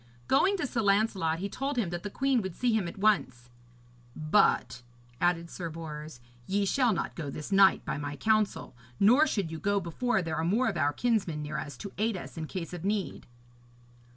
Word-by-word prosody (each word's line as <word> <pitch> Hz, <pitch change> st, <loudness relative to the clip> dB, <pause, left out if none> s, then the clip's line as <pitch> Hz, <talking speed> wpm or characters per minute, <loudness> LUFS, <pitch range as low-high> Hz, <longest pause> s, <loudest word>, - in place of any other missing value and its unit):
Going 385 Hz, +9 st, +3 dB
to 355 Hz, -, -1 dB
Sir 245 Hz, -4 st, -1 dB
Lancelot, 195 Hz, -5 st, +2 dB
he 190 Hz, +4 st, -3 dB
told 270 Hz, +6 st, -3 dB
him 200 Hz, -8 st, 0 dB
that 175 Hz, 0 st, -4 dB
the 205 Hz, -, -5 dB
queen 270 Hz, +2 st, +1 dB
would 190 Hz, -3 st, -5 dB
see 245 Hz, -2 st, +1 dB
him 215 Hz, -5 st, +1 dB
at 170 Hz, -, -8 dB
once; 130 Hz, -, +1 dB, 0.6 s
'but,' 155 Hz, -5 st, +2 dB, 0.4 s
added 170 Hz, -1 st, +1 dB
Sir 170 Hz, -2 st, -5 dB
Bors, 155 Hz, -4 st, -8 dB, 0.3 s
'ye 200 Hz, +1 st, +1 dB
shall 245 Hz, +4 st, +2 dB
not 190 Hz, -, -2 dB
go 155 Hz, -4 st, -5 dB
this 150 Hz, +6 st, -7 dB
night 195 Hz, 0 st, +5 dB
by -, -, -3 dB
my 145 Hz, 0 st, -4 dB
counsel, 215 Hz, -, 0 dB, 0.2 s
nor 250 Hz, +10 st, +6 dB
should 200 Hz, -, -2 dB
you 160 Hz, -, -5 dB
go 200 Hz, +3 st, +1 dB
before 195 Hz, +4 st, -1 dB
there 165 Hz, -1 st, -3 dB
are 160 Hz, -, -1 dB
more 215 Hz, +10 st, +2 dB
of -, -, -4 dB
our 145 Hz, -2 st, +2 dB
kinsmen 185 Hz, -7 st, 0 dB
near 150 Hz, 0 st, -4 dB
us 145 Hz, -4 st, -7 dB
to 200 Hz, -, -8 dB
aid 220 Hz, -1 st, +1 dB
us -, -, -9 dB
in 160 Hz, -2 st, -5 dB
case 180 Hz, -1 st, -6 dB
of 175 Hz, -1 st, -6 dB
need.' 205 Hz, 0 st, -2 dB
190 Hz, 205 wpm, -29 LUFS, 160-215 Hz, 0.6 s, nor